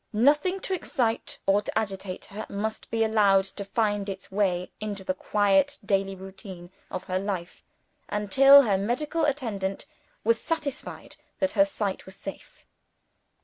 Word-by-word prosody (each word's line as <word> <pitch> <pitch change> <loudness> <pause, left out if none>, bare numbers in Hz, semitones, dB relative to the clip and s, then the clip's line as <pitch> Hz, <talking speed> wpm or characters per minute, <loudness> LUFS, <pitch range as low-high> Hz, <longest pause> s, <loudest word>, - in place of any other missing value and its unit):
Nothing 295 - +3
to 380 - 0
excite 260 -4 -1
or 195 +1 +4
to 210 - -4
agitate 195 -3 -3
her, 210 +1 -7
must 215 +2 -4
be 225 0 +1
allowed 205 -3 +4
to 195 +1 -7
find 205 0 0
its 195 0 -7
way 185 -3 0
into 205 -2 -5
the 185 - -1
quiet 205 +9 +2
daily 195 -1 +1
routine 190 -2 -10 0.2
of 185 - -5
her 185 -1 -1
life, 190 -3 -4 0.5
until 270 +8 +7
her 200 -5 +1
medical 295 +10 0
attendant 220 -10 -2 0.4
was 230 +1 +2
satisfied 310 -5 -4 0.2
that 285 - +1
her 295 - +5
sight 210 -12 -3
was 190 - -11
safe. 195 - -10
205 Hz, 145 wpm, -27 LUFS, 195-245 Hz, 0.5 s, until